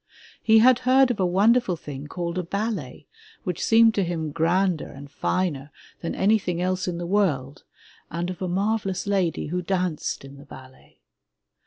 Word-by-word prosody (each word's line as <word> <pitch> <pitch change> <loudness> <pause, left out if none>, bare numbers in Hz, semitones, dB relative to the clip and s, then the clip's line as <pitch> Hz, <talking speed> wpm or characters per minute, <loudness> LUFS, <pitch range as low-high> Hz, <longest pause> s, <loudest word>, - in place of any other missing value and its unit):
He 220 0 +5
had 245 +2 +6
heard 255 0 +4
of 230 - -4
a 185 - +2
won 200 +6 +4
derful 240 -8 0
thing 145 -3 -8
called 175 +2 -4
a - - -2
ballet 200 - -4 0.4
which 180 -5 -3
seemed 225 0 +5
to 200 - +1
him 165 -3 -3
grander 170 +1 +1
and 140 +1 -11
finer 150 -7 -2 0.3
than 165 - -4
anything 190 -4 +1
else 185 +1 -1
in 175 -1 -2
the 175 - -4
world, 155 -8 -1 0.4
and 175 +3 -3
of 180 - -9
a 185 - -1
marvelous 195 +1 -1
lady 190 -7 0
who 180 +2 -2
danced 180 -6 -2
in 135 +1 -12
the 140 - -13
ballet. 130 0 -15
180 Hz, 175 wpm, -24 LUFS, 160-205 Hz, 0.4 s, had